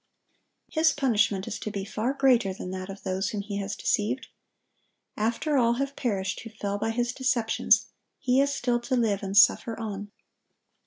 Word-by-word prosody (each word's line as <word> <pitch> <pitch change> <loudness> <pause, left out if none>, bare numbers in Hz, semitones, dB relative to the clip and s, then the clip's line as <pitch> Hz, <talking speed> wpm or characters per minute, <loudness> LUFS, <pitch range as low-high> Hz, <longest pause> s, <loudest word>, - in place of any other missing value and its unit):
His 320 0 +2
punishment 215 -8 +1
is 205 - -4
to 215 - -4
be 200 -2 -4
far 220 +5 -2
greater 250 -8 +3
than 180 - -6
that 185 0 -5
of 195 0 -9
those 190 +1 -1
whom 210 - -3
he 200 0 -5
has 200 0 -3
deceived. 215 +5 -1 0.9
After 235 +7 0
all 235 -1 +3
have 275 +3 -2
perished 195 -6 -2
who 225 - -8
fell 205 -2 -4
by 225 - -1
his 240 +2 -1
deceptions, 250 -4 +2 0.3
he 255 +1 +2
is 280 0 +2
still 245 -3 0
to 250 +2 -2
live 220 -5 +1
and 195 0 -2
suffer 225 +3 +5
on. 205 -2 -5
225 Hz, 175 wpm, -27 LUFS, 200-250 Hz, 0.9 s, suffer